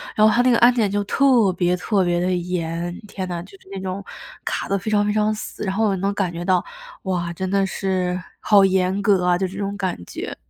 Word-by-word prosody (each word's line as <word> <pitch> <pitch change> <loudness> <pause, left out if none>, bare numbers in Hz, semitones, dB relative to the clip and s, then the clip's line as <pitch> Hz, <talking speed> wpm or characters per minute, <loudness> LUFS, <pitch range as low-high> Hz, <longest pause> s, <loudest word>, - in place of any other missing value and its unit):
然 215 - +5
后 215 - +4
它 240 - +4
那 255 - +3
个 235 - +4
安 245 +1 +6
检 225 -4 +1
就 205 +1 0
特 245 -3 +3
别 180 0 +2
特 190 +1 0
别 175 0 +1
的 185 +1 +1
严。 175 -1 -3
天 190 -2 -5
呐， 175 -1 -4
就 190 - -16
是 - - -24
那 195 - -5
种 190 +1 -4 0.4
卡 - - -3
得 200 - +2
非 200 +3 -4
常 205 -1 +2
非 210 - +1
常 215 0 +2
死， 215 - -7
然 190 - -1
后 220 0 +2
也 - - 0
能 195 +2 -1
感 195 -4 -1
觉 170 +1 -6
到 185 -1 +2 0.4
哇， 175 -3 -2
真 185 +2 -4
的 195 0 +2
是 185 -2 -1 0.2
好 205 -2 +5
严 190 0 +2
格 195 -3 +3
啊， 175 -1 +3
就 190 - -1
这 190 +1 -6
种 200 0 -3
感 190 -3 -2
觉。 - - -6
190 Hz, 270 characters per minute, -22 LUFS, 180-205 Hz, 0.4 s, 安